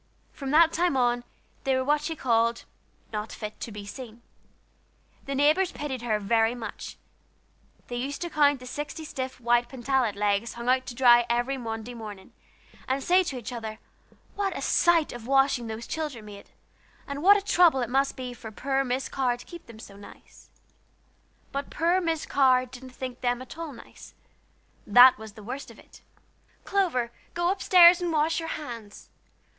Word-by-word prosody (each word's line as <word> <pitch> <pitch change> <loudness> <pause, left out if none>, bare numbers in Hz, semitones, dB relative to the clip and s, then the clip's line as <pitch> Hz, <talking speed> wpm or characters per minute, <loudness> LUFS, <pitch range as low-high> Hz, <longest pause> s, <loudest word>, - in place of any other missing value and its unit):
From 275 -2 -6
that 320 +3 +5
time 345 -4 +1
on, 245 -1 +1 0.4
they 265 -1 +1
were 260 - 0
what 295 +1 +2
she 320 +2 -4
called 230 -3 +1 0.5
"not 210 +1 -4
fit 215 -1 -7
to 230 - -6
be 205 -1 -8
seen." 235 +1 -10 1.0
The 275 - -3
neighbors 305 +7 +3
pitied 265 -4 -5
her 225 -3 0
very 225 +3 +1
much. 230 -2 -8 0.9
They 245 - -5
used 275 +3 -4
to 345 - -4
count 290 -2 +3
the - - -10
sixty 295 +4 -6
stiff 260 -3 -5
white 240 0 +2
pantalette 260 -3 0
legs 205 +2 0
hung 235 +1 -4
out 255 0 +2
to 240 - -6
dry 240 -1 +5
every 240 +3 0
Monday 230 -1 -6
morning, 210 -5 -10 0.5
and 265 +1 -1
say 365 +2 +4
to 270 - -4
each 245 +1 -7
other 220 -2 -6 0.6
what 395 -2 -2
a - - -5
sight 340 -3 +3
of 240 -1 -9
washing 270 -3 +2
those 220 +1 -6
children 295 -9 -5
made, 205 -1 -12 0.6
and 280 0 -5
what 400 +4 +7
a - - -2
chore 345 -9 +4
it - - -3
must 270 +3 +1
be 250 -1 -6
for 225 -2 -10
poor 270 +4 -1
Miss 255 +1 -2
Carr 250 -2 -1
to - - -13
keep 345 -5 -12
them 230 -2 -12
so 205 -3 -12
nice. 205 - -16 1.0
But 280 0 -4
poor 345 +4 +1
Miss 325 -3 -1
Carr 255 -2 +3
didn't 255 +1 -11
think 255 -1 -7
them 245 -1 0
at 255 +3 -10
all 330 -2 -6
nice; 240 - -14 0.7
that 245 +3 +8
was 220 -1 -10
the 215 -1 -13
worst 255 +6 -6
of - - -14
it. - - -18 0.6
"Clover, 320 -12 0 0.2
go 345 0 +1
up 385 - -4
stairs 355 -1 +7
and 350 -1 -1
wash 320 +1 +1
your 325 0 -5
hands! 230 -8 -8
255 Hz, 185 wpm, -26 LUFS, 235-295 Hz, 1.0 s, that